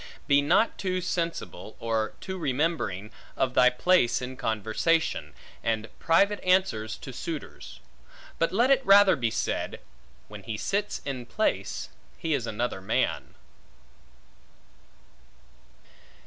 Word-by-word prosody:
Be 140 -1 +4
not 170 +10 +2
too 185 -1 -1
sensible, 165 - -4
or 115 -1 -1
too 190 0 -5
remembering, 130 - -1 0.3
of 130 -1 +1
thy 125 - +6
place 125 -1 +3
in 130 +1 -6
conversation, 115 +7 0 0.3
and 115 -1 -1
private 200 +5 +3
answers 155 - +1
to 135 - -9
suitors; 160 +4 -7 0.6
but 165 0 +2
let 240 +8 +3
it 270 0 +4
rather 200 -3 +7
be 120 -4 0
said, - - -2 0.5
When 105 -1 -10
he 105 +2 -5
sits 200 - -2
in 130 -4 -4
place, 115 - -1 0.3
he 165 -1 -1
is 125 -5 -1
another 110 -3 -2
man. 95 - -1
140 Hz, 120 wpm, -27 LUFS, 115-180 Hz, 0.6 s, rather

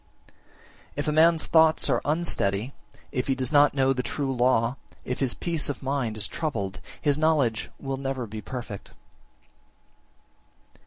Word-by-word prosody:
38. - - -26 0.6
If 145 - -3
a - - +2
man's 160 +1 +4
thoughts 160 -1 +4
are 125 -4 +1
unsteady, 140 -8 0 0.4
if 125 -2 -2
he 135 - +1
does 130 +1 -1
not 145 -1 +5
know 135 -1 +3
the 125 - -1
true 135 0 -3
law, 120 -1 +2 0.3
if 125 - -3
his 130 -3 0
peace 165 -3 0
of 145 - -5
mind 130 -5 -1
is 105 - 0
troubled, 100 - -3 0.2
his 145 -1 +1
knowledge 145 -8 +1
will 135 -1 -3
never 135 -2 -3
be 110 0 -7
perfect. 120 -3 -7
135 Hz, 155 wpm, -26 LUFS, 120-150 Hz, 0.6 s, not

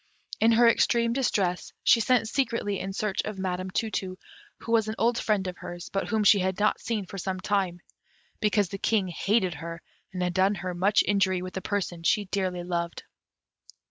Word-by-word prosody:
In 225 +1 +5
her 235 +1 +6
extreme 235 0 +3
distress, 195 -9 0
she 235 - +6
sent 230 0 +2
secretly 225 -6 -1
in 195 - -4
search 200 0 -1
of 215 -2 -5
Madam 185 0 -3
Tu 220 +4 -2
tu, 185 -2 -3 0.4
who 230 - -7
was 225 -2 +3
an 215 - -3
old 235 +1 +2
friend 210 -3 0
of 180 -1 -5
hers, 175 0 -8
but 195 - -2
whom 220 -2 +1
she 200 0 +6
had 190 +1 -1
not 210 - +2
seen 220 -4 -2
for 195 +2 -8
some 185 +1 -3
time, 185 -3 -1 0.6
because 210 -3 +2
the 195 - -6
King 200 -4 +1
hated 190 +1 +1
her, 165 +2 -7 0.3
and 180 -1 -3
had 180 0 -1
done 190 +2 +3
her 185 -2 -4
much 195 +4 +3
injury 190 -3 +2
with 185 - -7
a 190 - -3
person 185 -5 -3
she 205 +5 +2
dearly 185 -2 -2
loved. 170 -1 -3
195 Hz, 200 wpm, -27 LUFS, 185-215 Hz, 0.6 s, her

